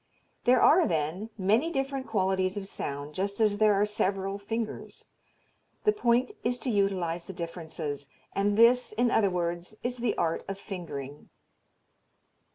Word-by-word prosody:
There 250 Hz, 0 st, +5 dB
are, 340 Hz, +3 st, +6 dB
then, 165 Hz, +6 st, -1 dB
many 220 Hz, -, +2 dB
different 270 Hz, -3 st, -2 dB
qualities 190 Hz, -2 st, +1 dB
of 200 Hz, -, -4 dB
sound, 145 Hz, -5 st, -5 dB
just 200 Hz, +4 st, -2 dB
as 210 Hz, -2 st, +3 dB
there 215 Hz, -1 st, +5 dB
are 200 Hz, +1 st, +3 dB
several 195 Hz, -1 st, -1 dB
fingers. 225 Hz, +2 st, -5 dB, 0.8 s
The 425 Hz, -, +5 dB
point 250 Hz, -, +2 dB
is 245 Hz, +1 st, 0 dB
to 255 Hz, -, 0 dB
utilize 185 Hz, -5 st, 0 dB
the 190 Hz, -, -7 dB
differences; 160 Hz, -4 st, -5 dB, 0.3 s
and 205 Hz, +1 st, +1 dB
this, 240 Hz, +1 st, +5 dB
in 240 Hz, +2 st, +2 dB
other 205 Hz, -3 st, +4 dB
words, 175 Hz, +2 st, -2 dB
is 245 Hz, +1 st, -2 dB
the 235 Hz, -2 st, -1 dB
art 165 Hz, -1 st, 0 dB
of 195 Hz, -, -4 dB
fingering. 150 Hz, -8 st, -7 dB
200 Hz, 150 wpm, -28 LUFS, 175-230 Hz, 0.8 s, are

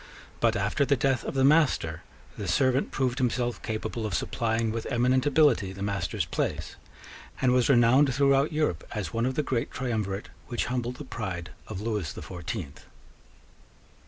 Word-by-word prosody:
But, -, -, +3 dB
after 100 Hz, +9 st, +1 dB
the 140 Hz, 0 st, +3 dB
death 135 Hz, 0 st, +1 dB
of -, -, -5 dB
the 135 Hz, -, +3 dB
master, 135 Hz, -, +3 dB, 0.3 s
the 100 Hz, -, -5 dB
servant 130 Hz, +7 st, +2 dB
proved 130 Hz, 0 st, -1 dB
himself 120 Hz, -1 st, 0 dB
capable 110 Hz, +1 st, -3 dB
of 105 Hz, -4 st, -2 dB
supplying 115 Hz, +1 st, 0 dB
with 115 Hz, 0 st, -4 dB
eminent 125 Hz, +2 st, +2 dB
ability 135 Hz, -10 st, +3 dB
the 95 Hz, +1 st, -6 dB
master's 100 Hz, -2 st, -1 dB
place, 80 Hz, -, -3 dB, 0.6 s
and 130 Hz, -, +3 dB
was 125 Hz, 0 st, +3 dB
renowned 130 Hz, +2 st, +5 dB
throughout 140 Hz, +2 st, +3 dB
Europe 150 Hz, -, 0 dB
as 105 Hz, 0 st, -4 dB
one 115 Hz, +2 st, +1 dB
of 130 Hz, -, -2 dB
the 150 Hz, -, +1 dB
great 125 Hz, -4 st, -1 dB
Triumvirate 110 Hz, -6 st, -3 dB, 0.2 s
which 120 Hz, -, -1 dB
humbled 125 Hz, 0 st, -2 dB
the 150 Hz, -, -8 dB
pride 95 Hz, -9 st, -5 dB, 0.2 s
of 100 Hz, -3 st, -5 dB
Lewis 105 Hz, -8 st, -2 dB
the -, -, -8 dB
Fourteenth. 85 Hz, -5 st, -6 dB
120 Hz, 165 wpm, -27 LUFS, 105-130 Hz, 0.6 s, renowned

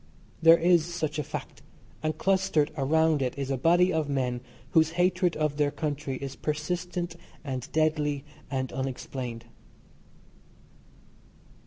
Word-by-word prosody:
There 165 Hz, 0 st, +8 dB
is 170 Hz, -1 st, +3 dB
such 155 Hz, -3 st, -2 dB
a -, -, 0 dB
fact, -, -, -7 dB, 0.4 s
and 155 Hz, -1 st, -1 dB
clustered 190 Hz, -5 st, +2 dB
around 160 Hz, +1 st, +2 dB
it 130 Hz, 0 st, -1 dB
is 140 Hz, -1 st, -2 dB
a -, -, +2 dB
body 175 Hz, +6 st, +4 dB
of 155 Hz, -2 st, 0 dB
men 125 Hz, -3 st, -1 dB, 0.3 s
whose 160 Hz, 0 st, +4 dB
hatred 180 Hz, -1 st, +2 dB
of 150 Hz, -2 st, 0 dB
their 145 Hz, -1 st, +3 dB
country 145 Hz, -2 st, -3 dB
is 135 Hz, 0 st, -6 dB
persistent 175 Hz, +3 st, -3 dB, 0.3 s
and 130 Hz, -4 st, -5 dB
deadly 150 Hz, -2 st, +1 dB, 0.2 s
and 130 Hz, -2 st, -2 dB
unexplained. 125 Hz, -2 st, -4 dB
155 Hz, 130 wpm, -28 LUFS, 135-165 Hz, 0.4 s, There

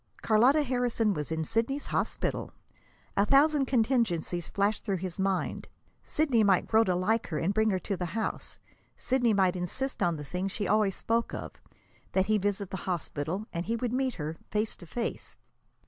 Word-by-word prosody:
Carlotta 250 Hz, +8 st, +5 dB
Harrison 245 Hz, -5 st, +1 dB
was 150 Hz, -3 st, -4 dB
in 160 Hz, 0 st, -1 dB
Sidney's 235 Hz, -, -1 dB
hospital! -, -, -2 dB, 0.6 s
A 200 Hz, -, +4 dB
thousand 275 Hz, +3 st, +4 dB
contingencies 220 Hz, -, +1 dB
flashed 205 Hz, +1 st, 0 dB
through 195 Hz, -3 st, -1 dB
his 180 Hz, 0 st, -5 dB
mind. 190 Hz, -1 st, -1 dB, 0.4 s
Sidney 275 Hz, -8 st, +2 dB
might 195 Hz, -3 st, +4 dB
grow 220 Hz, 0 st, +4 dB
to 180 Hz, -, +1 dB
like 215 Hz, +6 st, +1 dB
her 155 Hz, -, -3 dB
and 170 Hz, +6 st, 0 dB
bring 220 Hz, +1 st, +3 dB
her 190 Hz, -, +1 dB
to 195 Hz, +2 st, -3 dB
the 180 Hz, -1 st, -3 dB
house. 220 Hz, -, -3 dB, 0.4 s
Sidney 245 Hz, -2 st, +2 dB
might 190 Hz, -3 st, +3 dB
insist 185 Hz, +10 st, -3 dB
on 170 Hz, -1 st, +2 dB
the 150 Hz, -, -6 dB
thing 180 Hz, +6 st, -3 dB
she 205 Hz, +1 st, -3 dB
always 210 Hz, -3 st, +2 dB
spoke 230 Hz, +1 st, 0 dB
of -, -, -8 dB, 0.5 s
that 190 Hz, 0 st, +3 dB
he 215 Hz, +1 st, +2 dB
visit 200 Hz, -1 st, -1 dB
the 190 Hz, -, -3 dB
hospital; 175 Hz, +1 st, -3 dB
and 170 Hz, +1 st, -3 dB
he 230 Hz, -, +1 dB
would 240 Hz, 0 st, -2 dB
meet 260 Hz, 0 st, 0 dB
her, 155 Hz, +1 st, -4 dB
face 210 Hz, +1 st, 0 dB
to 175 Hz, -, -12 dB
face. 235 Hz, +8 st, -4 dB
205 Hz, 180 wpm, -29 LUFS, 180-235 Hz, 0.6 s, Carlotta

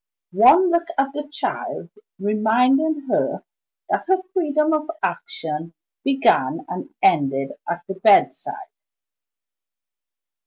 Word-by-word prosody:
One 370 Hz, 0 st, +6 dB
look 340 Hz, 0 st, +1 dB
at 275 Hz, 0 st, 0 dB
the 295 Hz, 0 st, -5 dB
child 300 Hz, -, -4 dB, 0.3 s
reminded 250 Hz, +9 st, +2 dB
her -, -, -1 dB, 0.4 s
that -, -, -2 dB
her 375 Hz, 0 st, +2 dB
freedom 310 Hz, -3 st, +1 dB
of 305 Hz, 0 st, -1 dB
action 165 Hz, -2 st, -4 dB, 0.3 s
began 275 Hz, +1 st, +1 dB
and -, -, -6 dB
ended 135 Hz, -, +2 dB, 0.2 s
at 170 Hz, 0 st, -3 dB
the 195 Hz, -, -4 dB
bedside. 295 Hz, -, +2 dB
275 Hz, 105 wpm, -21 LUFS, 190-315 Hz, 0.4 s, One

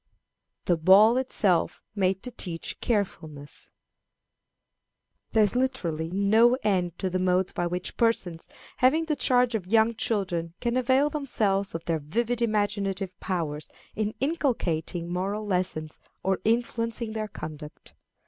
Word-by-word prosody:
The 175 Hz, -, +2 dB
Ball 195 Hz, +8 st, +6 dB
itself 205 Hz, -9 st, +1 dB
made 190 Hz, -2 st, 0 dB
to 250 Hz, -, -6 dB
teach 170 Hz, -7 st, -4 dB
Carefulness. 160 Hz, -, -3 dB, 1.6 s
There 220 Hz, -, +5 dB
is 205 Hz, +2 st, +1 dB
literally 170 Hz, -11 st, -1 dB
no 215 Hz, +6 st, +4 dB
end 180 Hz, -5 st, 0 dB
to 190 Hz, -, -2 dB
the 185 Hz, 0 st, -1 dB
modes 185 Hz, 0 st, +1 dB
by 175 Hz, -, -1 dB
which 180 Hz, +1 st, -4 dB
persons 185 Hz, -8 st, 0 dB, 0.3 s
having 300 Hz, +6 st, +3 dB
the 310 Hz, -2 st, 0 dB
charge 250 Hz, -3 st, +2 dB
of 200 Hz, -5 st, -2 dB
young 225 Hz, +2 st, +4 dB
children 180 Hz, -7 st, -2 dB
can 240 Hz, 0 st, -1 dB
avail 260 Hz, +3 st, +3 dB
themselves 205 Hz, -, 0 dB
of 165 Hz, -, -5 dB
their 165 Hz, -2 st, 0 dB
vivid 235 Hz, +11 st, -1 dB
imaginative 205 Hz, -4 st, 0 dB
powers 155 Hz, -5 st, -3 dB, 0.3 s
in 215 Hz, 0 st, -2 dB
inculcating 175 Hz, -, -1 dB
moral 200 Hz, +4 st, -2 dB
lessons 180 Hz, -5 st, -2 dB, 0.2 s
or 190 Hz, 0 st, +1 dB
influencing 230 Hz, 0 st, 0 dB
their 215 Hz, -1 st, -3 dB
conduct. 155 Hz, -6 st, -9 dB
200 Hz, 130 wpm, -27 LUFS, 175-230 Hz, 1.6 s, Ball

